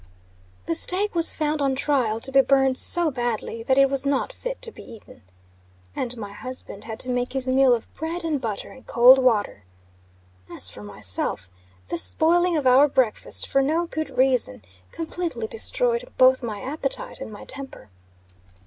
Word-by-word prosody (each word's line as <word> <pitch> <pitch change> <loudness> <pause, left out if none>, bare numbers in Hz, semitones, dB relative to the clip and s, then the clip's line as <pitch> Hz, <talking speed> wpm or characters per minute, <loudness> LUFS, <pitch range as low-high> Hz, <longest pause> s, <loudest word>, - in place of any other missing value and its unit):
The - - -1
steak 390 - +1
was 335 -1 +5
found, 305 -1 -2
on 270 -1 +1
trial, 260 -6 0
to 265 - -3
be 270 0 +6
burned 270 -1 +2
so 340 +3 +3
badly 240 -3 -3
that 260 +3 +1
it 275 0 +6
was 275 0 -1
not 280 -1 -1
fit - - -6
to 455 - -2
be - - -13
eaten. 225 - -14 0.7
And 245 -1 -3
my 205 -3 -7
husband 255 -3 -8
had 220 -1 -7
to 255 - -3
make 245 +1 -2
his 265 -1 -2
meal 260 -1 +4
of 230 - -7
bread 330 +3 -4
and 305 -4 -1
butter 215 -3 -5
and 260 - -16
cold 255 +2 +7
water. 220 - +1 0.9
As 90 +1 -2
for - - -11
myself, 95 -2 -4 0.4
this 170 - -1
spoiling 345 +1 +2
of 290 - -2
our 260 +3 +6
breakfast 260 -6 -1
for 275 - +2
no 315 +5 0
good 315 -2 -6
reason, 250 - +1 0.3
completely 340 +5 -4
destroyed 475 +2 0
both 255 +1 +5
my 215 -4 -5
appetite 275 0 -3
and - - -7
my 205 - -10
temper. 270 - -5
265 Hz, 175 wpm, -23 LUFS, 235-310 Hz, 0.9 s, cold